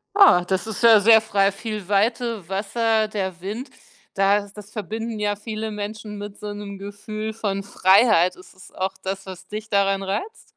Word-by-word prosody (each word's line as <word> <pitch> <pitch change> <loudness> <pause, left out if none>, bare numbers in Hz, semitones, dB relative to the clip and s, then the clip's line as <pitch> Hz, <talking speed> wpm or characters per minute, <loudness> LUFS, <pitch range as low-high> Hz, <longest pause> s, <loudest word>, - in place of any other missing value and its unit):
Ah, 390 - +7
das 190 +2 -1
ist 220 - -4
ja 225 -2 +8
sehr 220 +2 +7
frei. 200 -2 +2
Viel 210 -1 -6
Weite, 220 -1 0
Wasser, 220 +3 +1
der 190 -4 -4
Wind, 220 +8 -5 0.5
da 200 +1 +2
das 210 0 -12
verbinden 220 +1 -5
ja 205 0 0
viele 215 +1 -5
Menschen 210 0 -6
mit 205 0 -8
so 210 0 -5
'nem 205 -1 -7
Gefühl 215 +2 -6
von 205 -3 -2
Freiheit. 190 -2 +4
Ist 185 0 -16
es 185 - -15
auch 190 +1 -3
das, 195 +1 -4
was 185 0 -9
dich 215 +1 -7
daran 195 -1 +2
reizt? 205 - -4
205 Hz, 175 wpm, -23 LUFS, 195-220 Hz, 0.5 s, ja